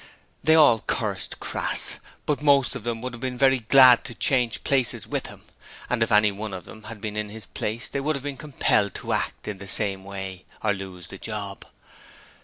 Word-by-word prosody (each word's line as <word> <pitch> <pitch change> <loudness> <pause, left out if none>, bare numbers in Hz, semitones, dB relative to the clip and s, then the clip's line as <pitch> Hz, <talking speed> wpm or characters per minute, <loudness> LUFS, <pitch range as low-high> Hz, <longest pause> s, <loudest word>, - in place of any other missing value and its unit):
They 160 - +5
all 145 -8 +6
cursed - - -2
Crass, - - 0 0.3
but 145 -1 0
most 140 -3 +4
of - - -6
them 115 -1 -3
would 125 -1 -4
have 120 - -8
been 130 -1 -3
very 135 0 +4
glad 125 +1 +7
to 120 - -6
change 125 -1 +1
places 130 -4 +1
with - - -3
him: - - -12 0.5
and 125 -2 0
if 115 - +1
any 105 0 +5
one 100 0 -6
of 90 - -9
them 110 -1 -13
had 115 -3 -9
been 105 -1 -4
in 105 -1 -3
his 110 -1 -8
place 115 +4 -4
they 140 - -3
would 155 +2 0
have 140 - -6
been 145 -1 -4
compelled 125 -8 +1
to - - -3
act - - -3
in 105 -3 -5
the 100 - -9
same 95 -1 0
way 95 -1 -7 0.2
or 105 -2 +2
lose 95 -2 -8
the 95 - -9
job. 100 -3 -5
110 Hz, 210 wpm, -25 LUFS, 100-130 Hz, 0.5 s, glad